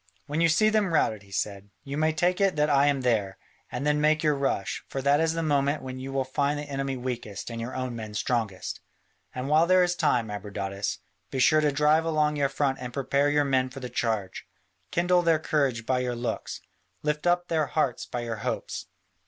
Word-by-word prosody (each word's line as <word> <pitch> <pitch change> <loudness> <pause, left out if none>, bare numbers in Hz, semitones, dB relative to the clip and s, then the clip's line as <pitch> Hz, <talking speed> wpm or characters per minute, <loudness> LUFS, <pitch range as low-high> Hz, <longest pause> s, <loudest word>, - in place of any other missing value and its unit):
"When 150 +2 -2
you 165 - +5
see 215 +7 +4
them 215 -4 +1
routed," 110 -8 +2
he 100 -1 -19
said, 100 0 -3
"you 140 - -5
may 155 +1 +2
take 175 +4 +1
it 195 -3 +3
that 150 0 +2
I 140 0 +4
am 140 -2 +2
there, 105 -6 0 0.3
and 140 - -3
then 150 0 +2
make 155 +1 +3
your 150 -1 +4
rush, 135 -8 -1
for 135 - -4
that 140 +2 +3
is 165 0 +2
the 165 0 -2
moment 145 -1 +1
when 130 0 -6
you 135 +1 -6
will 135 0 0
find 140 +3 0
the 145 - -4
enemy 135 -2 -3
weakest 120 -4 -5
and 115 0 -5
your 120 +3 -5
own 130 -2 -3
men 110 -2 -7
strongest. 110 -4 -2 0.6
And 130 +1 -3
while 155 +3 +4
there 185 0 +5
is 175 0 +1
time, 115 -9 +1
Abradatas, 100 -1 -4 0.3
be 135 - -4
sure 155 +4 +5
to 150 -1 +2
drive 150 +3 +3
along 155 -2 +1
your 140 -2 +1
front 135 -1 0
and 125 -1 -5
prepare 140 +2 +1
your 145 0 +2
men 130 -2 +1
for 130 +1 -9
the 125 -1 -6
charge, 110 -5 -2 0.4
kindle 175 +1 +3
their 165 -2 +3
courage 140 -7 0
by 130 +1 +1
your 125 -1 -2
looks, 120 0 -4 0.4
lift 150 +2 -1
up 175 0 +2
their 155 -3 +1
hearts 135 -6 -1
by 120 - -4
your 115 -1 -4
hopes. - - -4
140 Hz, 220 wpm, -27 LUFS, 120-155 Hz, 0.6 s, you